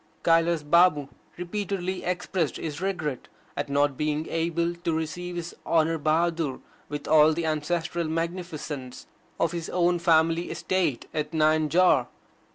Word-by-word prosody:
Kailas 165 -1 +3
Babu 150 -3 +4 0.3
repeatedly 185 0 -3
expressed 180 -2 -1
his 155 0 -5
regret 155 -9 -3 0.3
at - - -3
not 140 -1 +1
being 150 +1 -1
able 170 +1 0
to 170 -1 -3
receive 175 +3 -4
His 175 0 -5
Honour 165 0 +2
Bahadur 160 -2 0 0.3
with 145 0 -5
all 155 0 +6
the 165 +1 -2
ancestral 165 +2 -1
magnificence 160 -5 -4 0.3
of 165 - +2
his 170 -2 -5
own 175 0 +2
family 165 0 +3
estate 170 -10 -1
at 150 0 -3
Nayanjore. 155 +3 +3
165 Hz, 130 wpm, -26 LUFS, 155-175 Hz, 0.3 s, all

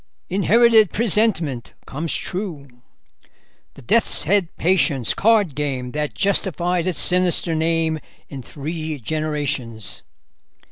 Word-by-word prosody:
"Inherited 220 +2 +4
presentiment 185 - 0
comes 155 +3 -3
true." 180 -7 -5 1.1
"The 140 - -14
Death's 225 - +2
Head 195 +1 +2
patience: 160 - +1
Card 210 -7 +2
game 130 -3 -3
that 150 +1 -3
justified 180 -3 0
its 175 -8 -2
sinister 180 +4 +2
name 160 0 0 0.3
in 135 -2 -8
three 155 +4 -5
generations." 140 - -4
160 Hz, 100 wpm, -21 LUFS, 145-190 Hz, 1.1 s, Inherited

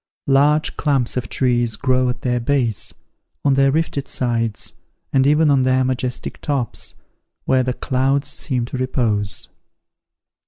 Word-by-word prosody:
Large 145 +3 +3
clumps 135 -6 +1
of 125 -3 -3
trees 120 -3 +1
grow 130 -2 +1
at 125 - -4
their 125 -1 +1
base, 120 -4 0 0.5
on 140 - +4
their 135 0 +4
rifted 145 -2 -1
sides, 115 -5 -2 0.4
and 135 0 +4
even 150 +1 +4
on 135 -2 +4
their 130 0 +3
majestic 130 -1 -3
tops, 135 -6 -3 0.5
where 130 -1 +3
the 125 0 -1
clouds 135 +2 0
seem 130 -4 -2
to 125 - -5
repose. 110 -6 0
130 Hz, 135 wpm, -20 LUFS, 120-140 Hz, 0.5 s, on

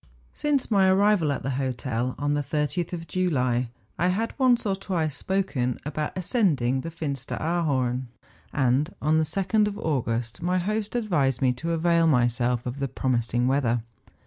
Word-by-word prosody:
Since 285 -5 0
my 195 -2 +5
arrival 190 -4 +4
at 140 - -3
the 135 - -1
hotel, 125 -1 -2
on 145 0 0
the 145 - +1
30th 150 +4 -2
of 170 -2 -5
July, 130 -9 0 0.3
I 175 - +3
had 215 +5 0
once 250 -3 +4
or 195 -2 +1
twice 175 -6 -2
spoken 150 -10 -1
about 150 +3 -3
ascending 155 - +1
the 165 - -5
Fin 160 -3 -3
steraarhorn; 135 -3 -1 0.4
and 135 +4 +1
on 155 +2 +2
the - - +3
2d 195 +6 +1
of 205 -1 -4
August 120 - -2
my 180 +2 +1
host 210 +3 -2
ad¬ 240 -2 -1
vised 135 - +1
me 125 -1 +4
to 165 +7 -3
avail 165 0 +3
myself 125 -3 +2
of 125 +3 -4
the 140 - 0
promising 120 -1 0
weather. 120 -4 +1
150 Hz, 170 wpm, -26 LUFS, 125-185 Hz, 0.4 s, my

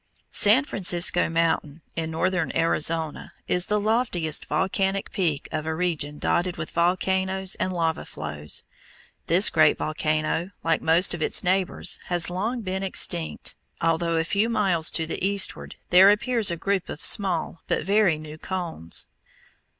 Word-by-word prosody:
San 225 +8 +5
Francisco 175 -6 +2
Mountain, 165 -2 -1
in 160 -1 -3
northern 180 +1 -1
Arizona, 165 -1 -1
is 180 0 -1
the 210 -1 +1
loftiest 205 - 0
volcanic 190 +4 -1
peak 165 -7 -1
of 155 0 -4
a 160 - -2
region 160 -4 -1
dotted 175 +3 -1
with - - -6
volcanoes 190 +2 0
and 185 - -1
lava 165 -3 -1
flows. 75 -1 -5 0.6
This - - +4
great - - +4
volcano, 155 +4 -2
like 165 -1 +1
most 165 +3 +3
of 175 - -6
its - - 0
neighbors, 185 0 +1
has 175 -1 -1
long 225 +7 -2
been 190 -2 -3
extinct, 175 -3 0 0.3
although 165 0 0
a 165 - +1
few 200 +7 0
miles 185 -8 +1
to 165 - -1
the 165 - -5
eastward 200 0 +1 0.2
there 185 +2 +8
appears 225 +1 +3
a 170 - -2
group 195 +1 -2
of 150 - -6
small 180 -4 +1
but - - -1
very 200 -4 +2
new 155 0 -10
cones. 170 - -4
175 Hz, 150 wpm, -24 LUFS, 160-190 Hz, 0.6 s, there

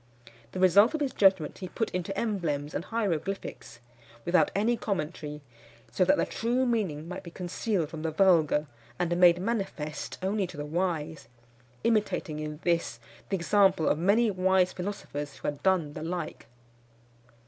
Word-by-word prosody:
The - - -4
result 200 - +5
of - - -2
his 280 -3 -1
judgment 190 -6 +3
he 185 -2 -6
put 225 - -2
into 185 +2 -3
emblems 160 -10 -2
and 170 - -3
hieroglyphics, 195 - -3 0.5
without 175 +1 +4
any 220 +4 +2
commentary, 155 -8 -4 0.5
so 185 - +2
that 290 - +4
the - - +2
true 245 +3 0
meaning 190 -11 -1
might 180 +2 -6
be 180 - -10
concealed 180 0 -2
from 160 -2 -7
the 160 - -1
vulgar, 160 -4 +3 0.3
and 175 -1 0
made 175 -1 +6
manifest 190 -7 -3
only 195 0 0
to - - -11
the 145 - -4
wise; 160 -3 -2 0.6
imitating 210 -9 0
in 150 0 -5
this 170 -9 0 0.3
the 195 - +1
example 190 -2 +3
of - - +2
many 210 +6 +3
wise 185 -1 +2
philosophers 160 -7 -5
who - - -6
had 145 -1 -3
done 180 -6 +2
the 155 - -7
like. 170 0 -5
180 Hz, 160 wpm, -28 LUFS, 155-200 Hz, 0.6 s, made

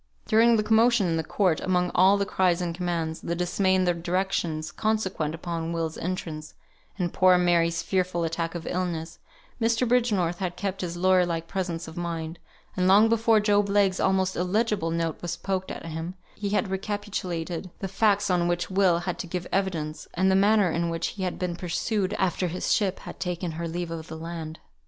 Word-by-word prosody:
During 230 +1 +5
the 215 - +2
commotion 225 0 +4
in 165 -2 0
the 160 - -1
court, 180 0 +1
among 180 -1 +1
all 190 +2 +5
the 200 - 0
cries 185 -3 +2
and 175 -2 -2
commands, 170 -2 -2
the 170 - -2
dismay 185 +2 +1
and 185 -1 +2
the 175 - +3
directions, 170 -2 -1
consequent 190 -8 -1
upon 165 0 -4
Will's 165 -1 -2
entrance, 160 -4 -5 0.4
and 175 -3 -2
poor 185 -1 +5
Mary's 170 -1 +2
fearful 180 -2 0
attack 165 +1 -2
of 170 - -5
illness, 170 -3 -3 0.4
Mr. 230 +2 +2
Bridgenorth 210 -8 +1
had 180 -2 -2
kept 195 0 -3
his 175 -1 -4
lawyer 185 0 +4
like 165 -1 -3
presence 175 -4 -3
of 160 +2 -10
mind; 165 -1 -4 0.4
and 185 0 +1
long 205 +4 +6
before 225 -1 +4
Job 205 -1 +2
Legh's 200 -2 +2
almost 190 0 +1
illegible 200 -1 0
note 165 -1 -2
was 170 -1 -3
poked 190 0 -2
at - - -7
him, 165 +2 -5 0.2
he 205 -1 -4
had 205 0 0
recapitulated 190 -4 -3
the 195 - -4
facts 205 0 +2
on 175 -1 +2
which 175 +2 -1
Will 185 -3 +4
had 180 0 -4
to - - -4
give 175 +1 -4
evidence, 165 -6 -2
and 190 +2 +3
the - - +4
manner 200 -2 +4
in 170 +1 0
which 165 0 -2
he 200 - -8
had 185 -1 -2
been 180 -2 -2
pursued, 190 +3 -1
after 185 -1 0
his 180 +2 -1
ship 195 -3 0
had - - -9
taken 180 -1 -3
her 165 +1 -4
leave 170 0 -4
of 160 -1 -6
the 160 - -7
land. 160 -1 -6
180 Hz, 195 wpm, -26 LUFS, 170-195 Hz, 0.4 s, long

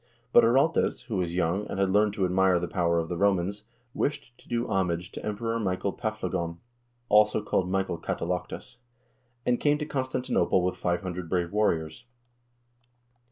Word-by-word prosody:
But - - +8
Araltes, 135 +8 +3
who 115 -5 -3
was 85 -2 -1
young 90 +4 0
and 95 - -4
had 95 -1 +2
learned 105 +1 +3
to 100 -3 0
admire 90 0 +3
the 90 - -3
power 85 -2 +1
of 80 -1 0
the 90 - -3
Romans, 100 0 +1 0.3
wished 140 -4 -2
to - - -20
do 120 0 -1
homage 90 -3 -1
to - - -8
Emperor 115 +2 -2
Michael 95 -1 -1
Paflagon 90 -7 -3 0.5
(also 105 0 +5
called 90 -3 0
Michael 95 -2 -1
Katalaktus), 90 +2 -4 0.7
and 120 -1 +2
came 145 0 +3
to 150 - -3
Constanti 130 -3 -3
nople 90 - +3
with 90 - 0
500 90 -1 -2
brave 85 -1 0
warriors. 105 0 0
95 Hz, 160 wpm, -27 LUFS, 90-110 Hz, 0.7 s, But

